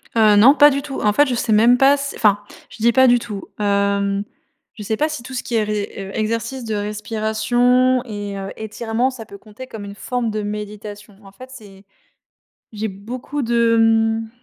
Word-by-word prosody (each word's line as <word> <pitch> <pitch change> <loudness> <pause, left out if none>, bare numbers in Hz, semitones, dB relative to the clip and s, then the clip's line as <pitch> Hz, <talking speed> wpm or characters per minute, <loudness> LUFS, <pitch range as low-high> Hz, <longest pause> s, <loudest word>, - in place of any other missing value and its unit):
Heu, 215 -2 +5
non, 240 +7 +7
pas 290 0 +7
du 280 0 -1
tout. 275 -1 -6
En 210 - +2
fait, 290 +6 +4
je 250 - -1
sais 225 -2 0
même 235 +4 +5
pas 270 +2 +5
s 280 0 -3
enfin, 205 -2 +3 0.3
je - - -13
dis: 235 +2 +4
«Pas 260 +3 +5
du 245 0 +5
tout», 210 -4 -7
hem, 200 -1 0 0.5
je 210 - -9
sais 220 +2 -2
pas 305 - +1
si 305 -6 -6
tout 260 +2 -10
ce 250 - -3
qui 240 - -4
est 220 - +2
ré 210 -1 -3
heu, 195 0 -7
exercices 230 +3 -3
de 220 -1 -3
respiration 225 +4 +1
et 205 -4 -6
heu, 195 0 -6
étirements, 225 +3 -2
ça 255 -4 -9
peut 200 - -12
compter 215 +5 -12
comme 220 -4 -8
une 200 0 -9
forme 245 +1 -3
de 215 0 -3
méditation. 210 0 -7
En 195 - -14
fait, 255 +6 -13
c'est 200 -6 -14 0.9
j'ai 220 0 -4
beaucoup 240 +8 -6
de, 235 -1 +2
mmh, 225 0 +2
220 Hz, 210 wpm, -19 LUFS, 205-245 Hz, 0.9 s, non